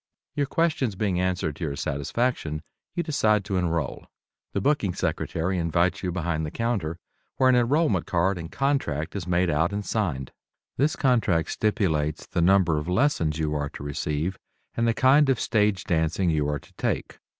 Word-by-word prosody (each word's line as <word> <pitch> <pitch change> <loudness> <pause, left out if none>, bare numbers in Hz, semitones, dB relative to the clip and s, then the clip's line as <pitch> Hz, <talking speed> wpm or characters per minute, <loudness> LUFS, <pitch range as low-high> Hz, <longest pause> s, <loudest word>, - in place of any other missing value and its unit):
Your 145 -1 0
questions 150 - 0
being 95 -2 0
answered 90 -5 -1
to - - -6
your 70 -3 -2
satisfaction, 75 - -2 0.3
you 175 - 0
decide 110 - +2
to 100 -3 -1
enroll. 85 -2 -2 0.4
The - - -1
booking 130 - +1
secretary 85 +1 -1
invites 85 +2 +1
you 90 - -2
behind 85 -2 -1
the 75 - -2
counter, 100 -7 -2 0.4
where 130 - +4
an 130 - +5
enrollment 120 - +2
card 90 +2 +1
and 80 0 -7
contract 130 - -1
is 95 -4 -4
made 90 0 +2
out 80 +5 +1
and 100 0 -3
signed. 80 - -2 0.4
This 145 +4 +1
contract 115 - +2
stipulates 80 - 0
the 85 - -2
number 90 -3 +4
of 75 - -6
lessons 90 - +1
you 75 -1 -1
are 75 -1 -2
to - - -9
receive 75 +5 -2 0.3
and 115 0 0
the 115 - +2
kind 135 +2 +5
of 130 - +2
stage 105 -4 +1
dancing 85 +2 +1
you 75 -2 +1
are 75 - 0
to - - -21
take. - - -2
90 Hz, 175 wpm, -26 LUFS, 80-115 Hz, 0.4 s, an